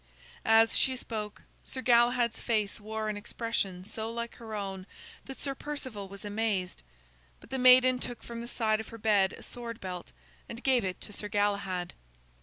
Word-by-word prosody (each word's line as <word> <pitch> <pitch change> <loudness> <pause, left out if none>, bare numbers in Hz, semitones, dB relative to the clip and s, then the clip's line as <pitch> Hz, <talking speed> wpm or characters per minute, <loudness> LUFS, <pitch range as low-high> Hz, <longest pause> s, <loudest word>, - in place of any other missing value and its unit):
As 225 0 +6
she 260 - +4
spoke, 215 -4 -5 0.2
Sir 260 - -4
Galahad's 240 -1 +4
face 215 -2 0
wore 215 +1 -3
an 215 - -1
expression 205 -4 -2
so 220 +2 -3
like 235 0 -4
her 220 -2 -7
own 195 -2 -4 0.4
that 270 - -8
Sir 275 - 0
Perceval 260 -8 -5
was 200 +1 -10
amazed. 205 -3 -1 0.6
But - - -17
the 265 - -1
maiden 255 0 +7
took 245 -1 -5
from 235 0 -6
the 235 - -6
side 220 -3 +1
of 220 - -6
her 230 - -9
bed 205 -3 +3
a - - -10
sword 235 -1 -6
belt, 180 -2 -6 0.4
and 235 +1 -7
gave 260 -3 +4
it 185 -1 -3
to 205 - -6
Sir 210 - -2
Galahad. 200 -3 0
220 Hz, 180 wpm, -30 LUFS, 205-240 Hz, 0.6 s, maiden